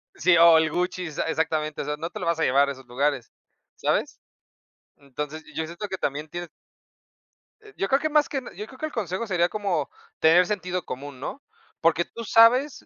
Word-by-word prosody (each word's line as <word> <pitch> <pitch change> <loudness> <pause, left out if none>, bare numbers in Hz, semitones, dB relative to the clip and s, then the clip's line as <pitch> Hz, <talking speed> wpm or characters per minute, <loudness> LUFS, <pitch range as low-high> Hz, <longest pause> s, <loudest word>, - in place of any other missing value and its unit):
sí, 170 +2 +4
o 170 -1 +8
el 160 -1 +2
Gucci, 180 0 -2
exa 155 0 -3
exactamente, 155 -1 -1
o - - -5
sea, 150 0 -3
no 165 +2 -4
te - - -8
lo - - -3
vas 170 -1 0
a - - +1
llevar 140 +2 +3
a - - -1
esos 135 -1 -11
lugares, 130 -1 -1 0.5
¿sabes? - - -1 0.8
Entonces, 150 +3 -7
yo 160 - -1
siento 170 +6 -6
que 190 - -3
también 150 0 -3
tienes 175 +1 -6 1.1
eh, 420 -1 -16
yo 195 - 0
creo 270 - +3
que 310 - 0
más 300 -1 +3
que 270 - -2
na 250 - -10
yo 210 - -7
creo 260 - -14
que 310 - -2
el 310 - -5
consejo 200 - -3
sería 175 -3 +1
como, 195 -8 -2 0.3
tener 170 +3 +6
sentido 180 -3 -3
común, 140 0 -7
¿no? 210 - -6 0.4
Porque 165 +1 +3
tú 230 - -9
sabes, 240 +7 +4
170 Hz, 210 wpm, -25 LUFS, 150-205 Hz, 1.1 s, o